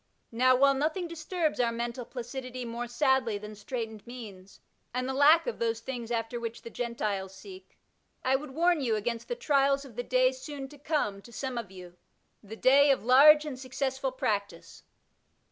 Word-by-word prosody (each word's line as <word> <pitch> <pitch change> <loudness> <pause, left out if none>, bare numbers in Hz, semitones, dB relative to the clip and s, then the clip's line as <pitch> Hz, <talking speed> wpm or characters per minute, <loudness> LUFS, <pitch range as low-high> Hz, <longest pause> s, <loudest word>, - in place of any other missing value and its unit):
Now, 255 +2 +4
while 275 +2 +5
nothing 310 +6 -1
disturbs 330 -1 -2
our 235 -1 +2
mental 235 +1 -4
placidity 255 0 -6
more 235 +1 -4
sadly 250 -3 +1
than 210 +1 -9
straightened 220 +1 -6
means, 205 -6 -10 0.4
and 255 0 -1
the 265 - -2
lack 295 +5 +6
of 485 - -4
those 225 -1 0
things 235 -1 -6
after 230 0 -2
which 230 0 -6
the 230 - -9
Gentiles 210 -6 -3
seek, 190 -1 -13 0.5
I 260 +1 +3
would 290 +2 -3
warn 335 +3 +2
you 235 -5 +1
against 230 +2 -3
the 485 - -2
trials 280 - +2
of 250 -5 -13
the 245 - -2
day 255 +1 +3
soon 270 +1 -7
to 295 - -15
come 275 -10 -1
to 235 - -15
some 260 +2 -4
of 230 -5 -4
you 180 -2 -12 0.2
— - - -45
^the 220 +2 -10
day 280 +3 +6
of 260 -6 +2
large 300 +5 +7
and 270 -4 -6
successful 265 0 -2
practice. 200 -9 -3
250 Hz, 185 wpm, -29 LUFS, 225-275 Hz, 0.5 s, large